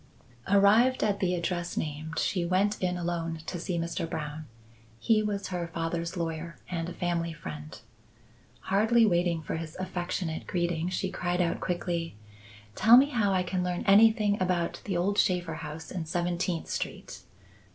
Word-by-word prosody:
Arrived 210 Hz, +6 st, +5 dB
at 205 Hz, -2 st, +1 dB
the 180 Hz, -1 st, +1 dB
address 175 Hz, 0 st, -2 dB
named, 155 Hz, +2 st, -4 dB
she 180 Hz, -4 st, 0 dB
went 190 Hz, +4 st, +1 dB
in 180 Hz, -1 st, 0 dB
alone 170 Hz, -2 st, -2 dB
to 180 Hz, -, -4 dB
see 175 Hz, +1 st, -2 dB
Mr. 165 Hz, 0 st, -2 dB
Brown. 150 Hz, 0 st, -5 dB, 0.5 s
He 215 Hz, -, +3 dB
was 205 Hz, -2 st, -2 dB
her 175 Hz, -2 st, -3 dB
father's 170 Hz, +1 st, -3 dB
lawyer 165 Hz, 0 st, -4 dB
and 170 Hz, -1 st, -2 dB
a -, -, -7 dB
family 170 Hz, -1 st, -1 dB
friend. 150 Hz, -1 st, -8 dB, 0.8 s
Hardly 220 Hz, +4 st, +3 dB
waiting 175 Hz, -4 st, +1 dB
for 160 Hz, -, -3 dB
his 160 Hz, -1 st, -7 dB
affectionate 180 Hz, -2 st, -3 dB
greeting, 175 Hz, -1 st, -1 dB
she 185 Hz, 0 st, -2 dB
cried 180 Hz, 0 st, -1 dB
out 170 Hz, -2 st, +1 dB
quickly. 175 Hz, -, -2 dB, 0.6 s
"Tell 225 Hz, -, +7 dB
me 275 Hz, +3 st, +5 dB
how 215 Hz, -6 st, +2 dB
I 185 Hz, -1 st, +2 dB
can 180 Hz, 0 st, -2 dB
learn 180 Hz, -1 st, -2 dB
anything 210 Hz, 0 st, +5 dB
about 180 Hz, -2 st, 0 dB
the 190 Hz, -4 st, -1 dB
old 200 Hz, +4 st, +1 dB
Shaffer 175 Hz, -4 st, +1 dB
house 160 Hz, +1 st, -7 dB
in 170 Hz, -4 st, -4 dB
Seventeenth 175 Hz, 0 st, -1 dB
Street. -, -, -5 dB
175 Hz, 160 wpm, -29 LUFS, 165-195 Hz, 0.8 s, Tell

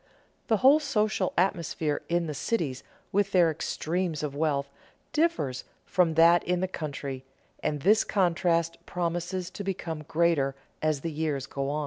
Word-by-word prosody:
The 220 Hz, -, +3 dB
whole 285 Hz, +3 st, +8 dB
social 215 Hz, -9 st, 0 dB
atmosphere 170 Hz, -5 st, 0 dB
in 170 Hz, 0 st, +1 dB
the 155 Hz, -, -3 dB
cities, 145 Hz, -, -2 dB, 0.3 s
with 200 Hz, 0 st, +1 dB
their 175 Hz, -3 st, +5 dB
extremes 165 Hz, +1 st, -2 dB
of 145 Hz, -2 st, -3 dB
wealth, 145 Hz, -2 st, 0 dB, 0.5 s
differs 300 Hz, -, 0 dB, 0.2 s
from 175 Hz, -4 st, +2 dB
that 170 Hz, +1 st, +6 dB
in 180 Hz, 0 st, 0 dB
the 185 Hz, -, 0 dB
country, 140 Hz, -6 st, -5 dB, 0.4 s
and 150 Hz, -2 st, -1 dB
this 215 Hz, +4 st, +5 dB
contrast 170 Hz, -3 st, +1 dB
promises 175 Hz, +1 st, -2 dB
to 200 Hz, -, -6 dB
become 170 Hz, -5 st, -4 dB
greater 155 Hz, -5 st, +2 dB, 0.3 s
as 155 Hz, -3 st, 0 dB
the 165 Hz, -, -3 dB
years 150 Hz, -3 st, -2 dB
go 140 Hz, 0 st, -3 dB
on. 150 Hz, +1 st, -1 dB
170 Hz, 150 wpm, -28 LUFS, 150-185 Hz, 0.5 s, whole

